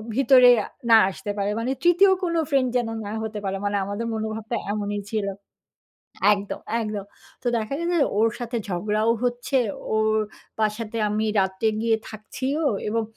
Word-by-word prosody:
ভিতরে 260 -1 +7
আ - - -7 0.2
না 225 - +10
আসতে 205 +1 -5
পারে। 200 0 0
মানে 240 +3 -1
৩য় 355 +3 +6
কোন 345 -2 0 0.2
ফ্রেন্ড 270 -3 +2
যেন 240 -2 0 0.2
না 205 - -5
হতে 215 -1 -4
পারে। 195 0 -1
মানে 205 0 0
আমাদের 205 +4 -4
মনোভাবটা 220 +1 -3 0.2
এমনই 205 0 -2
ছিল। 215 -2 -1 1.1
একদম, 200 -1 -3 0.2
একদম। 210 -3 -3 0.4
তো - - -9
দেখা 220 +2 -3
গেছে 340 +1 -1
যে, - - +3
ওর 225 +1 +4
সাথে 240 0 -4
ঝগড়াও 210 +4 0
হচ্ছে। 245 +2 0 0.4
ওর 220 0 +2 0.4
বাসাতে 215 +1 -1
আমি 215 +1 0
রাত্রে 190 +3 0
গিয়ে 225 0 +2
থাকছিও 260 +7 -4 0.3
এবং 225 +2 0
220 Hz, 160 wpm, -24 LUFS, 210-245 Hz, 1.1 s, না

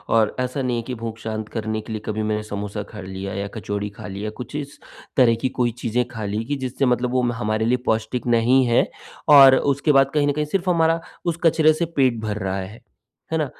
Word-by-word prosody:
और 110 -2 +3
ऐसा 125 +2 -2
नहीं 125 -2 -1
है 115 - -3
कि 125 - -3
भूख 115 -1 -6
शांत 110 -1 -5
करने 110 -1 -3
के 110 - -10
लिए 110 - -4
कभी 110 0 -2
मैंने 105 0 -1
समोसा 105 0 -5
खा 105 -2 -8
लिया 95 +1 -6
या 100 +1 -3
कचौड़ी 105 -1 -3
खा - - -8
लिया 100 +2 -6
या 110 - -2
कुछ 125 - -7
इस 145 -1 -6 0.4
तरह 120 -3 +5
की 130 - +1
कोई 120 -1 +2
चीज़ें 120 +1 +1
खा 110 -3 -5
ली 105 +2 -2
कि 145 +4 -2
जिससे 130 0 -2
मतलब 125 0 +1
वो 130 0 +2
हमारे 110 -1 -1
लिए 125 +2 +2
पौष्टिक 110 +3 -1
नहीं 120 +3 +4
है 120 - +3 0.5
और 135 -1 +9
उसके 140 +2 +1
बाद 135 -1 +4
कहीं 145 -1 +2
न 145 - +3
कहीं 150 +1 -1
सिर्फ़ 185 +4 -1
हमारा 165 -1 +3 0.3
उस 170 -1 0
कचरे 160 -1 +5
से 170 +2 -1
पेट 130 -4 +2
भर 105 -1 -3
रहा 95 0 -1
है, 95 +4 -8 0.5
है 160 - +1
ना? 155 - +1
120 Hz, 240 wpm, -22 LUFS, 110-135 Hz, 0.5 s, और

